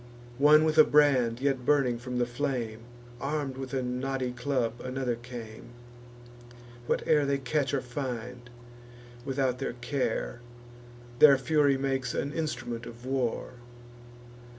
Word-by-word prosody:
One 150 Hz, +2 st, +7 dB
with 155 Hz, 0 st, +2 dB
a -, -, +11 dB
brand 130 Hz, -7 st, +3 dB
yet 135 Hz, -2 st, 0 dB
burning 130 Hz, -4 st, +2 dB
from 125 Hz, +1 st, -5 dB
the 120 Hz, -, +2 dB
flame, 120 Hz, -3 st, -3 dB, 0.4 s
Arm'd 140 Hz, -2 st, -2 dB
with 130 Hz, -1 st, -6 dB
a 130 Hz, -1 st, -1 dB
knotty 130 Hz, +1 st, -2 dB
club 125 Hz, -2 st, -2 dB
another 130 Hz, -1 st, -2 dB
came: 120 Hz, -1 st, -10 dB, 1.1 s
Whate'er 150 Hz, -2 st, +2 dB
they 140 Hz, 0 st, +1 dB
catch 140 Hz, +1 st, -1 dB
or 140 Hz, -, 0 dB
find, 125 Hz, -2 st, -6 dB, 0.8 s
without 130 Hz, -2 st, 0 dB
their 135 Hz, -, -3 dB
care, 120 Hz, -1 st, -3 dB, 0.8 s
Their 140 Hz, -3 st, +8 dB
fury 140 Hz, +1 st, +2 dB
makes 135 Hz, -2 st, -2 dB
an 140 Hz, +1 st, -2 dB
instrument 120 Hz, -7 st, -4 dB
of 120 Hz, +1 st, -11 dB
war. 130 Hz, -3 st, -1 dB
130 Hz, 130 wpm, -28 LUFS, 120-140 Hz, 1.1 s, a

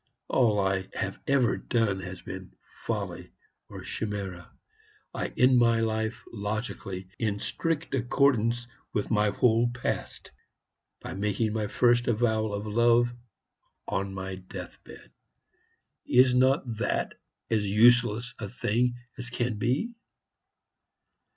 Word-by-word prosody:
All 110 Hz, -5 st, +3 dB
I 95 Hz, -1 st, 0 dB
have 95 Hz, 0 st, -3 dB
ever 135 Hz, -4 st, +3 dB
done 115 Hz, -5 st, 0 dB
has 95 Hz, -, -8 dB
been -, -, -8 dB, 0.3 s
folly -, -, -4 dB, 0.4 s
or -, -, -8 dB
chimera. 100 Hz, -5 st, -4 dB, 0.6 s
I -, -, -2 dB
end 125 Hz, 0 st, +6 dB
my 115 Hz, -1 st, +4 dB
life 110 Hz, 0 st, -1 dB
logically, 105 Hz, -3 st, -4 dB
in 105 Hz, -3 st, 0 dB
strict 165 Hz, +8 st, -2 dB
accordance 120 Hz, -2 st, +2 dB, 0.3 s
with 105 Hz, -1 st, -1 dB
my 105 Hz, -1 st, +3 dB
whole 115 Hz, +2 st, +3 dB
Past, 125 Hz, +1 st, -4 dB, 0.7 s
by -, -, -6 dB
making 105 Hz, +2 st, 0 dB
my 110 Hz, -1 st, -1 dB
first 120 Hz, +3 st, +3 dB
avowal 110 Hz, -2 st, +1 dB
of 100 Hz, +1 st, -3 dB
love 120 Hz, +2 st, +3 dB, 0.7 s
on 100 Hz, 0 st, -2 dB
my 95 Hz, 0 st, -5 dB
deathbed. 90 Hz, 0 st, -10 dB, 1.0 s
Is 125 Hz, 0 st, +5 dB
not 130 Hz, +2 st, +4 dB
that -, -, -1 dB, 0.4 s
as 110 Hz, -2 st, +2 dB
useless 120 Hz, +2 st, +4 dB
a 105 Hz, -3 st, -5 dB
thing 120 Hz, +2 st, 0 dB, 0.2 s
as 125 Hz, 0 st, -4 dB
can 120 Hz, -3 st, -2 dB
be?" 135 Hz, -, 0 dB
115 Hz, 120 wpm, -28 LUFS, 105-120 Hz, 1.0 s, end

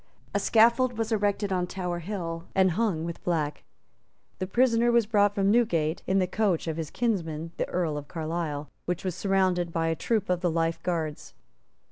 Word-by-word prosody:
A -, -, +2 dB
scaffold 235 Hz, +2 st, +4 dB
was 225 Hz, 0 st, -2 dB
erected 205 Hz, -2 st, +1 dB
on 180 Hz, -1 st, 0 dB
Tower 180 Hz, -2 st, -3 dB
Hill 170 Hz, -2 st, -5 dB
and 190 Hz, -1 st, +4 dB
hung 180 Hz, -4 st, 0 dB
with 170 Hz, -1 st, -6 dB
black. 155 Hz, -4 st, -1 dB, 0.8 s
The 185 Hz, -, -2 dB
prisoner 240 Hz, +2 st, +3 dB
was 235 Hz, -2 st, +4 dB
brought 205 Hz, -1 st, +3 dB
from 195 Hz, -1 st, +2 dB
Newgate 175 Hz, -9 st, +2 dB
in 190 Hz, -, +2 dB
the 185 Hz, -, +3 dB
coach 190 Hz, -2 st, 0 dB
of 160 Hz, -1 st, -2 dB
his 160 Hz, -3 st, -3 dB
kinsman 165 Hz, -9 st, -2 dB
the -, -, -2 dB
Earl 165 Hz, -4 st, -1 dB
of 145 Hz, -, -11 dB
Carlisle, 155 Hz, -3 st, -4 dB
which 180 Hz, +2 st, -3 dB
was 185 Hz, -, -1 dB
surrounded 185 Hz, -2 st, +1 dB
by 165 Hz, -1 st, 0 dB
a 165 Hz, -, 0 dB
troop 215 Hz, +4 st, 0 dB
of 180 Hz, -1 st, 0 dB
the 180 Hz, -, +2 dB
Life 165 Hz, 0 st, 0 dB
Guards. 160 Hz, -4 st, -3 dB
180 Hz, 185 wpm, -27 LUFS, 165-205 Hz, 0.8 s, scaffold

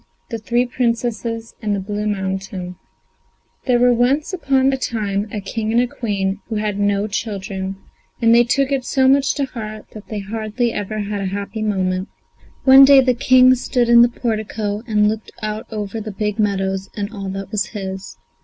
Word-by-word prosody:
THE 230 Hz, -, -3 dB
THREE 240 Hz, +3 st, +1 dB
PRINCESSES 230 Hz, -2 st, -2 dB
IN 210 Hz, -2 st, -1 dB
THE 200 Hz, -, -1 dB
BLUE 205 Hz, +2 st, -3 dB
MOUNTAIN 190 Hz, -2 st, -3 dB, 0.9 s
There 250 Hz, -1 st, +4 dB
were 245 Hz, 0 st, +4 dB
once 265 Hz, +8 st, +1 dB
upon 270 Hz, -6 st, +2 dB
a -, -, 0 dB
time 210 Hz, -5 st, -2 dB
a 210 Hz, -, -3 dB
King 215 Hz, +2 st, -3 dB
and 245 Hz, -, +2 dB
Queen 200 Hz, -4 st, -2 dB
who 225 Hz, -, -4 dB
had 210 Hz, -1 st, -2 dB
no 205 Hz, 0 st, +1 dB
children, 195 Hz, -3 st, -4 dB, 0.4 s
and 230 Hz, 0 st, +4 dB
they 240 Hz, +1 st, +7 dB
took 275 Hz, +3 st, +1 dB
it 270 Hz, -2 st, 0 dB
so 265 Hz, +1 st, +2 dB
much 275 Hz, +1 st, +3 dB
to 280 Hz, -, 0 dB
heart 215 Hz, -4 st, -7 dB
that 215 Hz, -1 st, -11 dB
they 215 Hz, -, -5 dB
hardly 220 Hz, +3 st, -2 dB
ever 210 Hz, +1 st, -3 dB
had 205 Hz, 0 st, -3 dB
a -, -, -2 dB
happy 200 Hz, +2 st, -5 dB
moment. 190 Hz, -2 st, -1 dB, 0.5 s
One 265 Hz, 0 st, +9 dB
day 275 Hz, 0 st, +8 dB
the 255 Hz, -1 st, +2 dB
King 255 Hz, +1 st, +5 dB
stood 245 Hz, -1 st, 0 dB
in 235 Hz, 0 st, +8 dB
the 240 Hz, -, +6 dB
portico 215 Hz, -3 st, -3 dB
and 210 Hz, -2 st, +3 dB
looked 215 Hz, 0 st, -3 dB
out 215 Hz, +1 st, -4 dB
over 215 Hz, 0 st, -4 dB
the 215 Hz, 0 st, -6 dB
big 210 Hz, +1 st, -3 dB
meadows 195 Hz, -2 st, 0 dB
and 205 Hz, 0 st, -4 dB
all 195 Hz, -2 st, -5 dB
that 195 Hz, 0 st, -6 dB
was 205 Hz, -3 st, 0 dB
his. 190 Hz, -2 st, -7 dB
215 Hz, 185 wpm, -19 LUFS, 200-240 Hz, 0.9 s, One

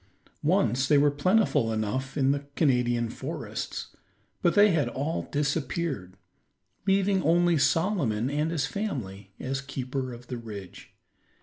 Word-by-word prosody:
Once 130 Hz, +4 st, +2 dB
they 145 Hz, -, +5 dB
were 145 Hz, +1 st, +4 dB
plentiful 165 Hz, -, +2 dB
enough 110 Hz, +6 st, -2 dB
in 135 Hz, -1 st, +3 dB
the 140 Hz, 0 st, -2 dB
Canadian 125 Hz, -5 st, +2 dB
forests, -, -, -5 dB, 0.5 s
but 170 Hz, -, +2 dB
they 205 Hz, 0 st, +7 dB
had 150 Hz, -7 st, +2 dB
all 145 Hz, +6 st, -3 dB
disappeared, 140 Hz, -, -2 dB, 0.7 s
leaving 195 Hz, 0 st, +3 dB
only 175 Hz, +1 st, +3 dB
Solomon 150 Hz, -, +1 dB
and 150 Hz, +3 st, 0 dB
his 160 Hz, -5 st, 0 dB
family 105 Hz, -, -4 dB
as 135 Hz, +1 st, -3 dB
keeper 130 Hz, -1 st, -4 dB
of 120 Hz, 0 st, -10 dB
the 125 Hz, -, -5 dB
ridge. 105 Hz, -6 st, -9 dB
140 Hz, 130 wpm, -27 LUFS, 120-165 Hz, 0.7 s, they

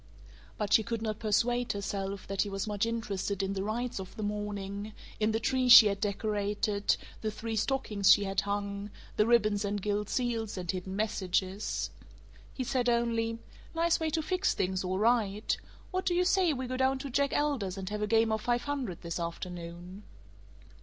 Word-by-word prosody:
But 210 Hz, -2 st, -1 dB
she -, -, +7 dB
could 230 Hz, 0 st, -3 dB
not 215 Hz, -2 st, -2 dB
persuade 240 Hz, +3 st, +1 dB
herself 200 Hz, -1 st, -4 dB
that 195 Hz, 0 st, -1 dB
he 205 Hz, -, 0 dB
was 195 Hz, 0 st, -3 dB
much 210 Hz, +1 st, -1 dB
interested 200 Hz, -4 st, -2 dB
in 195 Hz, 0 st, -1 dB
the 195 Hz, -, -2 dB
rites 225 Hz, +3 st, -2 dB
of 190 Hz, -1 st, -8 dB
the 215 Hz, -, -5 dB
morning, 205 Hz, 0 st, -4 dB, 0.3 s
in 215 Hz, 0 st, +2 dB
the 220 Hz, -, 0 dB
tree 255 Hz, +2 st, +1 dB
she 240 Hz, -2 st, +12 dB
had 200 Hz, -1 st, 0 dB
decorated, 205 Hz, 0 st, 0 dB, 0.2 s
the 220 Hz, -, -1 dB
three 225 Hz, +1 st, -4 dB
stockings 215 Hz, -4 st, +2 dB
she 205 Hz, -, +6 dB
had 195 Hz, 0 st, 0 dB
hung, 200 Hz, 0 st, -3 dB, 0.3 s
the 210 Hz, -, +3 dB
ribbons 215 Hz, -3 st, +3 dB
and 205 Hz, 0 st, -1 dB
gilt 205 Hz, +1 st, -1 dB
seals 230 Hz, -5 st, -1 dB
and 180 Hz, -2 st, -2 dB
hidden 190 Hz, +1 st, -5 dB
messages. 195 Hz, -1 st, -1 dB, 0.6 s
He 260 Hz, -, -4 dB
said 250 Hz, -1 st, +1 dB
only: 230 Hz, -1 st, +1 dB, 0.4 s
"Nice 335 Hz, 0 st, +2 dB
way 320 Hz, -1 st, 0 dB
to 320 Hz, 0 st, -1 dB
fix 365 Hz, +3 st, +1 dB
things, 185 Hz, 0 st, -1 dB
all 185 Hz, 0 st, -1 dB
right. 215 Hz, -1 st, +2 dB, 0.4 s
What 370 Hz, 0 st, -2 dB
do 350 Hz, -, +2 dB
you 360 Hz, +1 st, +3 dB
say 370 Hz, -2 st, +3 dB
we 260 Hz, -3 st, -3 dB
go 255 Hz, +1 st, -3 dB
down 265 Hz, +1 st, +2 dB
to 275 Hz, 0 st, -6 dB
Jack 280 Hz, +2 st, +2 dB
Elder's 255 Hz, -11 st, 0 dB
and 190 Hz, -1 st, -5 dB
have 210 Hz, 0 st, -3 dB
a 210 Hz, -, 0 dB
game 225 Hz, 0 st, +3 dB
of 220 Hz, 0 st, 0 dB
five 240 Hz, +1 st, 0 dB
hundred 265 Hz, -, -3 dB
this 170 Hz, 0 st, -3 dB
afternoon?" 175 Hz, +2 st, -6 dB
210 Hz, 190 wpm, -30 LUFS, 200-240 Hz, 0.6 s, she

